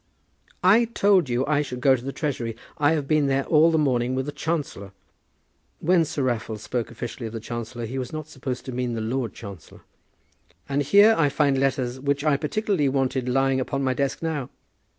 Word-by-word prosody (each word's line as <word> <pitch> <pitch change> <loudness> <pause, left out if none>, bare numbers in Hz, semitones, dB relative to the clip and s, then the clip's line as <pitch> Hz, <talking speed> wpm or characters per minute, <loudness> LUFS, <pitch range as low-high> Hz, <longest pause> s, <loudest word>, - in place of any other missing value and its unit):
"I 210 +6 +6
told 200 - +2
you 125 +2 0
I 150 0 +2
should 125 -4 -5
go 135 +1 +5
to 120 - -7
the 135 - -4
Treasury. 125 -7 -3 0.2
I 145 +1 +4
have 150 -3 -2
been 155 -2 +2
there 135 0 +1
all 160 +1 +5
the 160 - +2
morning 130 -4 +1
with 130 0 -1
the 145 - -4
chancellor," 145 - -4 0.9
when 175 0 +3
Sir 145 -2 -3
Raffle 115 -3 -2
spoke 115 +2 -3
officially 120 0 -6
of 110 - -9
the 115 - -4
chancellor 120 +1 -5
he 130 +4 -4
was 130 - -5
not 155 -1 -6
supposed 130 -3 -5
to 130 - -5
mean 125 -1 -2
the 115 - -3
Lord 120 +2 -2
Chancellor 100 -6 -11 0.9
"and 140 +1 0
here 205 +9 +6
I 150 -3 +3
find 140 -1 +2
letters 130 -2 0
which 140 +1 -1
I 150 -2 +3
particularly 155 0 0
wanted 130 -1 0
lying 135 +1 +2
upon 140 +1 -2
my 130 -1 +1
desk 140 +3 -2
now. 150 -6 -2
135 Hz, 200 wpm, -24 LUFS, 125-150 Hz, 0.9 s, I